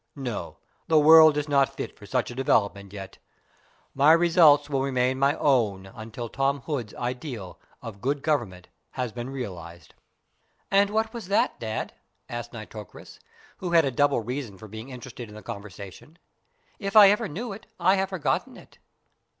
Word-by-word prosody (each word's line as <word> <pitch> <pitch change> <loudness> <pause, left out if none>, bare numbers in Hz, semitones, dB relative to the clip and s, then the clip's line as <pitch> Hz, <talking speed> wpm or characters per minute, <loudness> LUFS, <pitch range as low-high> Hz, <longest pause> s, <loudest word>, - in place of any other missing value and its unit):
No, 125 -7 -5 0.3
the 160 - +4
world 155 0 +8
is 150 0 -1
not 140 -3 +2
fit - - -5
for - - -14
such - - -1
a - - -9
development 100 -6 0
yet. 95 -2 -9 0.7
My 145 +3 +6
results 165 -4 +5
will 135 -2 -1
remain 130 -1 0
my 140 +2 +3
own 110 -9 +1
until 110 +4 -8
Tom 135 +3 -1
Hood's 125 -8 -4
ideal 125 - -5 0.2
of 100 -3 -9
good 140 +2 -1
government 105 - -1 0.3
has 125 -3 -3
been 120 +2 -6
realised." 85 - -8 0.8
"And 200 +1 +4
what 220 +1 -1
was 230 -6 -7
that, 200 - +1
Dad?" 110 -1 -4 0.3
asked 120 0 -6
Nitocris, 110 -3 -11 0.4
who 180 -2 -4
had 165 -2 +5
a 135 - 0
double 140 0 +2
reason 120 -3 -5
for 110 - -11
being 110 +5 -9
interested 125 -2 -9
in 105 - -12
the 110 - -11
conversation. 100 - -10 0.6
"If 195 0 -4
I 205 -2 +9
ever 210 +1 0
knew 200 +7 -5
it, 205 - -12
I 180 +2 +4
have 190 0 0
forgotten 185 -6 -2
it." - - -17
135 Hz, 165 wpm, -26 LUFS, 110-155 Hz, 0.8 s, I